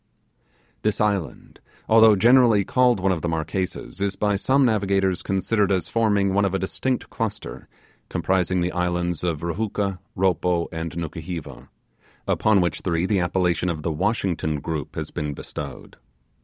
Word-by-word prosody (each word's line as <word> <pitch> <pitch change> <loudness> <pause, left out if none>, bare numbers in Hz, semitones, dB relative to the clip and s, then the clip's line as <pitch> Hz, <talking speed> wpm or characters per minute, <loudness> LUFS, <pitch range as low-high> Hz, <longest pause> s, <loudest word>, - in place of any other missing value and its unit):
This 105 -1 0
island, 100 -6 -2 0.3
although 110 -1 +7
generally 115 -1 +5
called 125 -4 +3
one 95 +1 +1
of 85 -3 -1
the 85 - -1
Marquesas, 80 -2 -3
is 100 -1 0
by 105 -1 +1
some 135 +7 +3
navigators 95 -5 +1
considered 100 +1 0
as 90 -3 0
forming 105 -4 +2
one 100 +1 +2
of 95 -1 0
a - - +3
distinct 125 +7 -2
cluster, 110 - -5 0.4
comprising 90 +1 0
the 90 +1 0
islands 90 -1 -1
of 85 -3 -2
Ruhooka, 100 +1 -2 0.2
Ropo, 90 -2 +1
and 80 -1 -4
Nukuheva; 85 0 -6 0.6
upon 105 -3 +3
which 85 -3 -1
three 85 -1 0
the 100 0 +1
appellation 90 -1 0
of 80 -3 -4
the 85 - -1
Washington 90 -4 -1
Group 75 -1 -5
has - - -5
been 75 -1 -4
bestowed. 70 -2 -8
95 Hz, 150 wpm, -23 LUFS, 85-105 Hz, 0.6 s, although